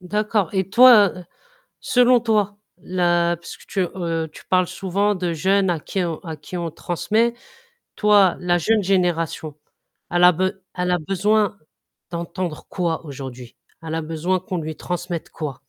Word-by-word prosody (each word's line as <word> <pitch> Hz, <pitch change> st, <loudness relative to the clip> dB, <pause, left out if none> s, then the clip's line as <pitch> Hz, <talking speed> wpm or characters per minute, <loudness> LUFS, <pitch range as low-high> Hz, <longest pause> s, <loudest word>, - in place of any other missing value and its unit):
D'accord. 210 Hz, 0 st, 0 dB
Et 190 Hz, -1 st, 0 dB
toi, 230 Hz, -3 st, +7 dB, 0.7 s
selon 245 Hz, -1 st, +4 dB
toi, 210 Hz, -3 st, +1 dB, 0.2 s
là, 175 Hz, -1 st, +1 dB
puisque 170 Hz, -, -12 dB
tu 195 Hz, -, -2 dB
heu 165 Hz, -3 st, -2 dB
tu -, -, -13 dB
parles 185 Hz, -1 st, +3 dB
souvent 200 Hz, +3 st, -1 dB
de 175 Hz, -2 st, -2 dB
jeunes 190 Hz, +4 st, +2 dB
à 165 Hz, -, 0 dB
qui 190 Hz, +4 st, -3 dB
on 165 Hz, -2 st, -3 dB
à 160 Hz, -3 st, -7 dB
qui 150 Hz, +5 st, -8 dB
on 170 Hz, -1 st, -3 dB
transmet, 220 Hz, +9 st, 0 dB, 0.6 s
toi, 205 Hz, -4 st, +4 dB
la 175 Hz, -1 st, +1 dB
jeune 215 Hz, +4 st, +2 dB
génération, 165 Hz, -5 st, 0 dB, 0.6 s
elle 175 Hz, 0 st, +2 dB
a 180 Hz, -, +9 dB
be 185 Hz, +3 st, 0 dB, 0.2 s
elle 180 Hz, 0 st, -1 dB
a 180 Hz, -, +3 dB
besoin 205 Hz, +4 st, +1 dB, 0.5 s
d'entendre 170 Hz, -1 st, -4 dB
quoi 170 Hz, -3 st, -2 dB
aujourd'hui? 130 Hz, -3 st, -9 dB, 0.3 s
Elle 160 Hz, 0 st, -4 dB
a 165 Hz, -, -1 dB
besoin 165 Hz, +4 st, -1 dB
qu'on 185 Hz, 0 st, -5 dB
lui 155 Hz, 0 st, -5 dB
transmette 175 Hz, -1 st, -4 dB
quoi? 150 Hz, -5 st, -5 dB
180 Hz, 155 wpm, -22 LUFS, 165-200 Hz, 0.7 s, a